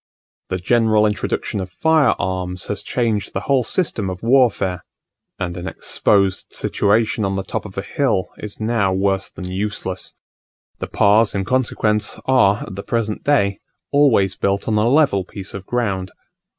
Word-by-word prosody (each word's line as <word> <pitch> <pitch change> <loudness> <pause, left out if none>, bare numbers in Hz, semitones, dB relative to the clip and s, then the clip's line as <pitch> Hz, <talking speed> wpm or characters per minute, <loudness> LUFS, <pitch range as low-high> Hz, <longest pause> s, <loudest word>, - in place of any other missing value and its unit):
The 95 - -1
general 110 +2 +3
introduction 105 0 -2
of 95 -1 -4
fire 155 - +3
arms 90 0 -3
has 105 - -2
changed 115 -4 -1
the 95 - -2
whole 135 +2 +2
system 115 - -1
of 90 +1 -7
warfare; 115 -8 +2 0.5
and 90 -1 -3
an 90 0 -6
exposed 100 0 +1
situation 110 +1 +1
on 95 0 0
the 95 - -2
top 95 - -4
of 95 -2 -10
a 95 - -2
hill 130 - 0
is 105 -1 -8
now 110 -3 +1
worse 95 0 0
than 90 - -9
useless. 95 -1 -4 0.7
The - - -4
Pas 105 +2 +3
in 95 -1 -1
consequence 110 -4 0
are, 105 -7 +3
at 100 - -9
the 100 - -5
present 110 -1 -2
day, 100 -9 +2 0.3
always 115 -10 +3
built 100 +2 -1
on 110 - +1
a 110 +3 +3
level 135 -9 +3
piece 95 +1 -8
of 100 -1 -8
ground. 100 -6 -1
100 Hz, 165 wpm, -20 LUFS, 95-115 Hz, 0.7 s, general